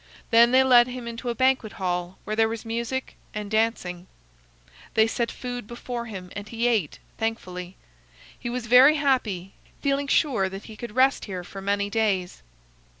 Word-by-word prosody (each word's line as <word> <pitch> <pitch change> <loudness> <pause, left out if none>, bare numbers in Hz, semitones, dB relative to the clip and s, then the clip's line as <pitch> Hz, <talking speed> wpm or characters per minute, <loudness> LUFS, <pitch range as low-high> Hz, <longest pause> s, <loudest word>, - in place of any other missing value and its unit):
Then 235 +1 +7
they 260 +1 +6
led 245 -2 +6
him 250 -1 -6
into 235 +1 -5
a 235 - -2
banquet 260 -3 +2
hall 180 -1 -3
where 215 - -3
there 225 0 +3
was 225 0 -5
music 235 +3 -3 0.2
and 210 -1 -5
dancing. 200 -5 -1 0.9
They 220 - +6
set 230 +1 -1
food 245 -3 -6
before 240 0 -5
him, 185 -4 -8
and 205 +1 -6
he 230 +1 0
ate, 215 -11 0 0.2
thankfully. 185 -5 -4 0.6
He 240 - -4
was 245 0 -3
very 255 +6 +7
happy, 230 - 0 0.3
feeling 280 0 +1
sure 240 -10 +2
that 195 +2 -8
he 220 - -11
could 235 0 -8
rest 265 +1 +3
here 185 -3 -5
for 195 +2 -9
many 200 +1 0
days. 200 -5 0
225 Hz, 170 wpm, -25 LUFS, 200-245 Hz, 0.9 s, Then